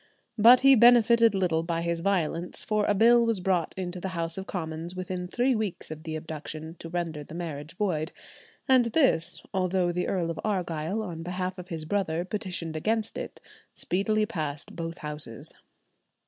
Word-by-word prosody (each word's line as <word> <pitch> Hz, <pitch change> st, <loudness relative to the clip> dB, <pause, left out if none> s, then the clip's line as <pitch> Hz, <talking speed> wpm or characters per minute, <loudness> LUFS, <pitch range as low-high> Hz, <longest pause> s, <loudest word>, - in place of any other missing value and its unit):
But 240 Hz, +4 st, +8 dB
he 275 Hz, 0 st, +8 dB
benefited 235 Hz, -2 st, +6 dB
little 175 Hz, -4 st, +1 dB
by 165 Hz, 0 st, -2 dB
his 170 Hz, 0 st, -1 dB
violence, 175 Hz, -2 st, -1 dB
for 210 Hz, -1 st, +1 dB
a 205 Hz, -, +2 dB
bill 235 Hz, +3 st, +6 dB
was 230 Hz, -3 st, +1 dB
brought 180 Hz, -2 st, 0 dB
into 180 Hz, -1 st, -4 dB
the 190 Hz, -, -4 dB
House 165 Hz, 0 st, -2 dB
of 190 Hz, 0 st, -6 dB
Commons 165 Hz, 0 st, -5 dB
within 185 Hz, -1 st, -4 dB
three 245 Hz, +7 st, +1 dB
weeks 215 Hz, -8 st, -3 dB
of 155 Hz, 0 st, -7 dB
the 160 Hz, 0 st, -5 dB
abduction 155 Hz, +1 st, -6 dB
to 165 Hz, -, -8 dB
render 165 Hz, -3 st, -3 dB
the 155 Hz, -, -11 dB
marriage 160 Hz, -1 st, -6 dB
void, 170 Hz, -6 st, -1 dB, 0.6 s
and 255 Hz, -2 st, +5 dB
this, 225 Hz, -, +2 dB
although 185 Hz, -1 st, +1 dB
the 180 Hz, +1 st, -2 dB
Earl 175 Hz, -3 st, 0 dB
of 165 Hz, -, -6 dB
Argyll 180 Hz, -1 st, -1 dB
on 170 Hz, -5 st, -6 dB
behalf 180 Hz, +2 st, -3 dB
of 180 Hz, -, -8 dB
his 165 Hz, -4 st, -5 dB
brother 175 Hz, -2 st, -1 dB
petitioned 180 Hz, -5 st, -3 dB
against 220 Hz, +7 st, -1 dB
it, -, -, -6 dB, 0.4 s
speedily 215 Hz, +4 st, +1 dB
passed 155 Hz, -9 st, -5 dB
both 165 Hz, 0 st, -5 dB
Houses. 150 Hz, -7 st, -6 dB
180 Hz, 175 wpm, -27 LUFS, 165-205 Hz, 0.6 s, But